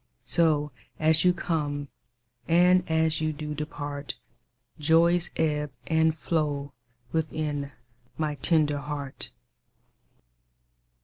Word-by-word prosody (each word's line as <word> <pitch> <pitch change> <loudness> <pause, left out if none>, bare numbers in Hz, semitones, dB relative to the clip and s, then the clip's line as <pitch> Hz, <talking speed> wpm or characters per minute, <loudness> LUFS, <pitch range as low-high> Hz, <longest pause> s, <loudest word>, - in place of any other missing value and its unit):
So 150 -3 +2 0.3
as 160 0 +4
you 180 - +6
come 145 -5 -2 0.6
and 180 +2 +5
as 160 -1 +2
you 155 0 +1
do 150 0 -5
depart, 145 -1 -5 0.6
Joys 165 +3 +4
ebb 150 -2 0
and 160 -1 +2
flow 145 -4 -1 0.4
within 150 -2 -2 0.5
my 155 -2 -1
tender 150 -1 +2
heart. 145 -1 -3
155 Hz, 90 wpm, -27 LUFS, 145-160 Hz, 0.6 s, you